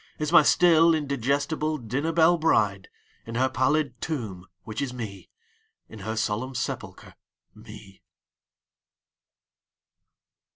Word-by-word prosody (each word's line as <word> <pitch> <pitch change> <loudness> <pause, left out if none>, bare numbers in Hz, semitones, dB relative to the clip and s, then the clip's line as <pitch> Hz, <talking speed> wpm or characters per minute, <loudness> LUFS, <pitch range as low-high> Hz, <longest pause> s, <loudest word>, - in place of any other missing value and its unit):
Is 150 0 -3
n^y 165 -3 +7
still 165 +1 +5
indigestible 145 +2 -1
dinner 135 +6 -3
belle 165 +1 +4
bride, 105 - +1 0.4
In 115 - -6
her 130 +2 +2
pallid 130 0 0
tomb, 110 - -5 0.2
which 110 +3 -5
is 140 -3 -2
Me, 105 -5 -8 0.6
In 110 - -11
her 110 +3 -4
solemn 115 +4 -2
sepulcher, - - -5 0.4
Me. 110 -3 -14
130 Hz, 110 wpm, -25 LUFS, 110-155 Hz, 0.6 s, n^y